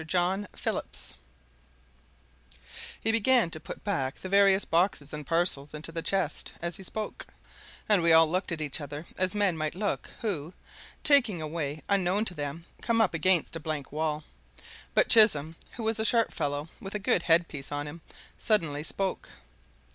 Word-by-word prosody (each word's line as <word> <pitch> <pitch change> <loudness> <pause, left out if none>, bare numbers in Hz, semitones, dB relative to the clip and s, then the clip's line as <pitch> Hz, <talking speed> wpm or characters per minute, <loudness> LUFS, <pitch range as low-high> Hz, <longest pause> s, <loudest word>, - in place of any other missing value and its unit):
JOHN 185 +4 0
PHILLIPS - - -3 1.9
He 225 - +1
began 230 -4 +3
to 155 - -6
put - - -9
back 140 -10 -1
the 185 - -8
various 200 0 +4
boxes 165 -4 0
and 150 -2 -6
parcels 165 -4 0
into 155 +2 -6
the 165 0 -4
chest 185 -4 -1
as 170 0 -3
he - - -10
spoke, 215 +3 -5 0.6
and 205 -4 +4
we 165 0 +3
all 160 0 +7
looked 185 +4 -2
at 165 -2 -3
each 150 0 -2
other 145 +2 -7
as 185 +2 +2
men 200 -4 +2
might 155 0 -3
look 205 +2 -2
who, 180 -7 -3 0.5
taking 250 - +4
a 155 - -4
way 150 -1 -4
unknown 200 +1 +2
to 185 - -2
them, 150 +1 -5 0.2
come 230 -1 +1
up 220 -6 +3
against 165 0 +2
a - - -4
blank 155 -3 -5
wall. 155 0 -2 0.7
But - - +5
Chisholm, 165 -9 +6 0.2
who 235 - -6
was 220 0 0
a - - +1
sharp 230 +1 +3
fellow, 145 +1 -2
with 195 +1 -7
a - - +2
good 195 -3 +1
headpiece 165 -5 +1
on 145 0 -3
him, 160 +3 -9 0.4
suddenly 165 -10 +1
spoke. 190 +4 -1
170 Hz, 170 wpm, -28 LUFS, 155-200 Hz, 1.9 s, all